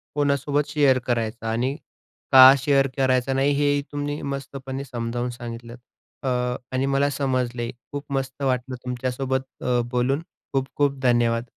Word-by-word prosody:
कोणासोबत 145 0 +1
शेअर 140 -4 +3
करायचं? 115 -1 -1
आणि 120 +5 0 0.6
का 130 0 +10
शेअर 135 0 +2
करायचा 130 0 +2
नाही? 135 +2 +2
हेही 145 0 +2
तुम्ही 145 0 -3
मस्तपणे 135 -1 -5
समजावून 120 -1 -3
सांगितलत. 120 0 -8 0.5
अ, - - -2 0.4
आणि 130 +1 0
मला 140 +1 +2
समजले. 125 -4 -1 0.2
खूप 145 0 -4
मस्त 135 0 -3
वाटलं 130 -1 -1
तुमच्यासोबत 130 +1 -2 0.2
अ, 125 -1 +2
बोलून. 130 +4 +1 0.3
खूप-खूप 135 +1 0
धन्यवाद. 120 -2 +2
130 Hz, 130 wpm, -24 LUFS, 125-140 Hz, 0.6 s, का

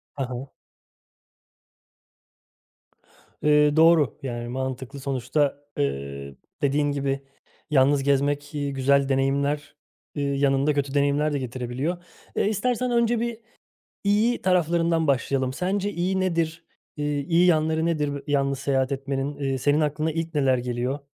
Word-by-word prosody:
Ha 140 - -2
ha. 125 +2 -6 2.9
Eee, 150 0 +4
doğru, 160 -5 +5
yani, 120 -2 -4
mantıklı. 130 +1 -4
Sonuçta, 135 +2 0 0.2
ııı, 70 0 -3 0.3
dediğin 145 +1 +1
gibi 140 -1 -2 0.4
yalnız 140 -1 +3
gezmek, 145 +2 0
eee, 145 -1 -1
güzel 140 +1 +2
deneyimler, 140 +2 0 0.4
eee, 145 - -2
yanında 140 +1 +2
kötü 140 -1 -2
deneyimler 145 +1 +2
de 145 - 0
getirebiliyor. 130 +7 -3 0.3
Eee, - - +1
istersen 245 +4 0
önce 235 -1 +2
bir 235 -1 -3 0.7
iyi 215 +4 +2
taraflarından 170 -2 +2
başlayalım. 135 -1 +1
Sence 190 +7 -1
iyi 185 +2 0
nedir, 165 -2 -1 0.3
eee, 150 - -3 0.2
iyi 170 +5 +3
yanları 160 -1 +2
nedir 150 -4 -1
yalnız 140 -2 +1
seyahat 135 -1 0
etmenin? 135 +1 -3
Eee, 135 -2 -1
senin 145 +4 +2
aklına 150 +1 0
ilk 165 +1 -4
neler 135 -3 +3
geliyor? 125 +2 -2
145 Hz, 125 wpm, -25 LUFS, 135-160 Hz, 2.9 s, doğru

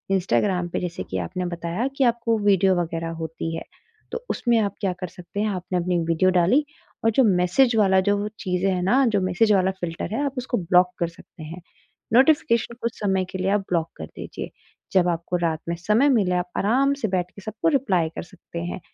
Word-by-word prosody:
Instagram 185 -1 +1
पे - - -2
जैसे 175 -1 -4
कि 95 - -1
आपने 180 - -4
बताया 175 +7 -2
कि 275 - +3
आपको 235 -1 +1
वीडियो 195 -1 +4
वगैरह 165 0 -3
होती 165 0 -4
है, - - -5 0.5
तो 480 - -5
उसमें 240 -2 +1
आप 200 -2 0
क्या 190 -2 0
कर 180 - -2
सकते 180 +4 -9
हैं, 215 - +1
आपने 185 -1 -3
अपनी 180 +1 -1
एक 165 - -3
वीडियो 170 +3 +3
डाली, 245 - +3 0.4
और 225 - +5
जो 260 +4 +4
मैसेज 200 +6 +3
वाला 190 -3 +4
जो 205 +2 +1
वो 205 +1 -2
चीज़ें 185 +1 0
हैं 180 - -1
ना, 255 +8 +3
जो 205 -4 +1
मैसेज 185 +4 +2
वाला 190 -1 +3
फ़िल्टर 170 +4 -4
है, 285 - 0
आप 275 - -2
उसको 245 0 -2
ब्लॉक 180 0 +3
कर 170 - +1
सकते 165 -1 -14
हैं। 170 +3 -8 0.5
नोटिफ़िकेशन 240 -3 +3
कुछ 235 -1 -3
समय 190 -3 +1
के 190 - -4
लिए 185 +1 0
आप 205 0 +2
ब्लॉक 165 -2 0
कर 80 - -6
दीजिए। - - -8 0.4
जब 180 -2 +4
आपको 170 +1 -2
रात 165 -2 -1
में 170 - -1
समय 215 +11 +3
मिले, 195 -8 +2
आप 180 0 -1
आराम 265 +7 +2
से 220 - +1
बैठ 180 -1 -1
के 200 - -13
सबको 215 +7 -3
रिप्लाई 185 -11 0
कर - - -4
सकते 170 -1 -10
हैं 175 +2 -4
185 Hz, 220 wpm, -23 LUFS, 175-220 Hz, 0.5 s, और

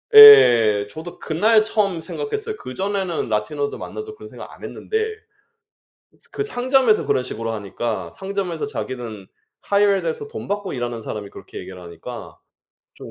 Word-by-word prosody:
예. 115 - +9
저도 160 +6 -9
그날 215 +7 +3
처음 200 -6 0
생각했어요. 435 - -4
그전에는 195 - -3
라티노들 140 +7 -2
만나도 430 0 -7
그런 - - -11
생각 - - -11
안했는데. 440 0 -3 1.1
이제 - - -17
그 420 - -2
상점에서 255 - +2
그런 125 - +1
식으로 115 -2 -4
하니까 110 +2 -4
상점에서 195 -2 -3
자기는 120 - -6 0.4
hired 200 -1 +3
돼서 465 -3 -3
돈 450 - -7
받고 205 -1 -3
일하는 120 -2 -4
사람이 105 -2 -6
그렇게 - - -11
얘기를 90 -1 -9
하니까 85 -1 -9 0.6
좀 - - -11
190 Hz, 360 characters per minute, -21 LUFS, -, 1.1 s, 예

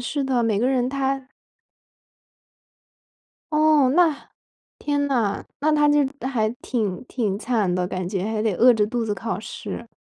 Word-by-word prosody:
是 280 +4 -2
的， 260 -3 +1
每 220 -3 +1
个 245 +4 +2
人 255 -2 +1
他 270 -1 -2 2.3
哦， 305 -3 +4
那 330 -5 +2 0.5
天 285 -1 0
呐， 230 -7 0 0.2
那 310 +2 +2
她 295 -1 +4
就 290 -1 +4 0.2
还 220 -5 0
挺 210 -7 -2
挺 210 -6 -2
惨 220 -5 0
的 180 0 0
感 185 -1 -4
觉， 190 -1 -2
还 215 0 -2
得 220 -3 +1
饿 245 +7 +6
着 210 -1 +2
肚 235 +1 -2
子 210 -2 -1
考 225 0 -4
试， 235 +1 -7
245 Hz, 170 characters per minute, -23 LUFS, 215-275 Hz, 2.3 s, 饿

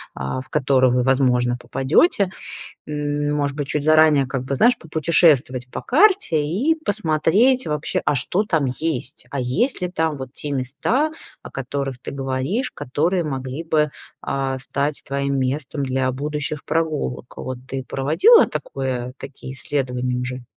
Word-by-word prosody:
а, 65 - -3
в 130 - -15
которую 130 -3 +3
вы, 125 - +2
возможно, 125 -2 +2
попадете? 185 - +2 0.6
М, 145 0 -2
может 145 -1 -1
быть, 145 -2 -3
чуть 150 -1 -1
заранее, 155 -3 +5
как 130 0 -3
бы, 135 +1 -2
знаешь, 240 - +4
попутешествовать 150 -6 +2
по - - -5
карте 325 - +3
и 230 - +1
посмотреть 205 +9 +2
вообще, 150 -1 -1
а 150 - +2
что 160 +9 0
там 160 -9 0
есть. 155 -3 -3
А 140 - -2
есть 190 - +1
ли 180 - 0
там 160 -4 -1
вот 130 -2 -8
те 150 - -5
места, 140 - 0 0.3
о - - -10
которых 135 0 -4
ты - - -7
говоришь, 135 - -2
которые 165 +7 -1
могли 135 +2 -4
бы, 150 -2 +2 0.3
а, 135 -1 -2
стать 140 +3 -2
твоим 140 0 -1
местом 135 +2 -2
для 130 -1 0
будущих 150 +2 -3
прогулок? 155 -6 -2
Вот 130 -1 -5
ты 135 +1 -4
проводила 160 - +5
такое 125 -2 -4
такие 135 -1 -9
исследования 125 -1 -2
уже? 125 0 -4
140 Hz, 150 wpm, -21 LUFS, 130-160 Hz, 0.6 s, заранее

